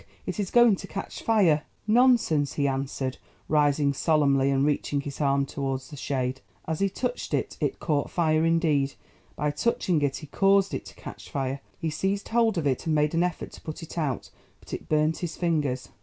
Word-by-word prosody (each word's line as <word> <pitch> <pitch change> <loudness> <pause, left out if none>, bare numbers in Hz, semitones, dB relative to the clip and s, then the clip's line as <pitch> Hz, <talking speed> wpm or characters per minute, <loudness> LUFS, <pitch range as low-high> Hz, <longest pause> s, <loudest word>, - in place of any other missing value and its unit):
it - - -4
is 200 -3 -1
going 240 -3 +6
to - - -9
catch 195 - -6
fire!" 185 -10 +3 0.2
"Nonsense," 215 - +3
he 140 -1 +1
answered, 135 -1 -2 0.3
rising 145 -1 +3
solemnly 140 -3 +3
and 135 0 +2
reaching 145 -1 0
his 140 +1 -6
arm 140 -1 +2
towards 135 -1 -4
the - - -7
shade. 130 -2 -2 0.3
As 160 -1 -2
he 195 - +2
touched 245 +5 -2
it, - - -2
it - - -1
caught 145 -4 0
fire; 160 -2 +2
indeed, 160 -4 +2 0.4
by 150 0 0
touching 170 -1 0
it 140 -2 +1
he 155 - -8
caused 195 +5 +3
it - - -4
to - - -12
catch - - -10
fire. 135 0 -2 0.2
He 160 - -2
seized 195 +6 -2
hold 225 -3 +2
of 165 - -1
it, 135 +3 0
and 155 - +2
made 150 +1 +2
an 165 - +2
effort 180 -2 -2
to - - -12
put 155 +1 -7
it 165 - -9
out, 150 -7 -2 0.3
but - - -13
it - - -6
burnt 155 +1 +2
his 175 -2 -4
fingers. 150 -7 -1
150 Hz, 200 wpm, -26 LUFS, 140-180 Hz, 0.4 s, going